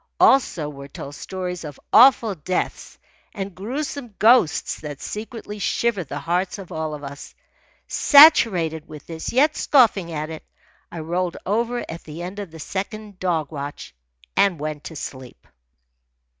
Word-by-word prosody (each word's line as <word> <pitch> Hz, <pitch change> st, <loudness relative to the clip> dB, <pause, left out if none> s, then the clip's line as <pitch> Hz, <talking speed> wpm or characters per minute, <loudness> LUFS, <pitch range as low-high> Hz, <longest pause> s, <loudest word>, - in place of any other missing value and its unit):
Also 210 Hz, -, +4 dB
were 140 Hz, -1 st, -9 dB
told 140 Hz, 0 st, -9 dB
stories 180 Hz, +2 st, -5 dB
of 150 Hz, -3 st, -8 dB
awful 240 Hz, -4 st, +7 dB
deaths 180 Hz, +2 st, -3 dB, 0.4 s
and 195 Hz, -2 st, -5 dB
gruesome 245 Hz, -, -5 dB
ghosts 225 Hz, -8 st, +3 dB
that 145 Hz, -2 st, -7 dB
secretly 210 Hz, -1 st, -7 dB
shivered 205 Hz, -5 st, 0 dB
the 145 Hz, -, -5 dB
hearts 180 Hz, +5 st, -1 dB
of 195 Hz, -3 st, -10 dB
all 155 Hz, -1 st, -3 dB
of 145 Hz, -, -11 dB
us. 140 Hz, 0 st, -9 dB, 0.5 s
Saturated 195 Hz, -, +6 dB
with 150 Hz, -1 st, -11 dB
this, 165 Hz, -1 st, -5 dB
yet 290 Hz, +5 st, +3 dB
scoffing 210 Hz, -, +3 dB
at 155 Hz, 0 st, -4 dB
it, 160 Hz, -, -8 dB, 0.5 s
I 170 Hz, -, -6 dB
rolled 175 Hz, +2 st, -2 dB
over 235 Hz, +4 st, -1 dB
at 165 Hz, +1 st, -8 dB
the 160 Hz, +3 st, -8 dB
end 185 Hz, +3 st, -6 dB
of 200 Hz, -3 st, -6 dB
the 160 Hz, 0 st, -12 dB
second 200 Hz, -, -6 dB
dog 165 Hz, -5 st, -1 dB
watch 145 Hz, -1 st, -7 dB, 0.4 s
and 195 Hz, -4 st, +3 dB
went 150 Hz, 0 st, -5 dB
to 160 Hz, -, -7 dB
sleep. 130 Hz, -3 st, -8 dB
180 Hz, 150 wpm, -22 LUFS, 155-215 Hz, 0.5 s, awful